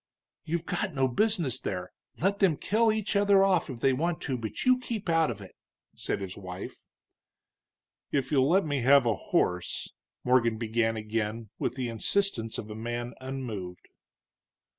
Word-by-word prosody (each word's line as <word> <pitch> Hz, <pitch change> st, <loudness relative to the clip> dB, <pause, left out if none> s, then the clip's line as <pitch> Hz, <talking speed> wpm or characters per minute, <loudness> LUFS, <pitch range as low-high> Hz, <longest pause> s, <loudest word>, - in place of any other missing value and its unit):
"You've 170 Hz, +1 st, -2 dB
got 190 Hz, -7 st, -2 dB
no 135 Hz, -1 st, +3 dB
business 165 Hz, -, +1 dB
there 90 Hz, -1 st, -4 dB, 0.3 s
let 195 Hz, +4 st, +1 dB
them 180 Hz, -7 st, +4 dB
kill 220 Hz, +2 st, +2 dB
each 215 Hz, -1 st, -1 dB
other 200 Hz, -1 st, +5 dB
off 185 Hz, -4 st, +2 dB
if 120 Hz, -3 st, -7 dB
they 135 Hz, -, +4 dB
want 165 Hz, +5 st, 0 dB
to, 135 Hz, -, -2 dB
but 115 Hz, -3 st, -4 dB
you 255 Hz, 0 st, +5 dB
keep 225 Hz, -5 st, -5 dB
out 165 Hz, -1 st, +3 dB
of 110 Hz, -4 st, -5 dB
it!" 95 Hz, -, -12 dB, 0.4 s
said -, -, -3 dB
his 95 Hz, -1 st, -5 dB
wife. 90 Hz, -2 st, -8 dB, 1.3 s
"If 135 Hz, -1 st, 0 dB
you'll 135 Hz, -1 st, +4 dB
let 190 Hz, +2 st, +4 dB
me 145 Hz, -3 st, -1 dB
have 135 Hz, +1 st, +6 dB
a 115 Hz, -, +3 dB
horse 90 Hz, -2 st, -1 dB, 0.2 s
" -, -, -64 dB
Morgan 120 Hz, -3 st, +3 dB
began 115 Hz, 0 st, 0 dB
again, 110 Hz, 0 st, -3 dB
with 125 Hz, -, -1 dB
the 130 Hz, -2 st, -2 dB
insistence 115 Hz, -, 0 dB
of 105 Hz, -, -6 dB
a -, -, -6 dB
man 120 Hz, +2 st, -4 dB
unmoved. 115 Hz, -9 st, -6 dB
130 Hz, 170 wpm, -29 LUFS, 110-175 Hz, 1.3 s, have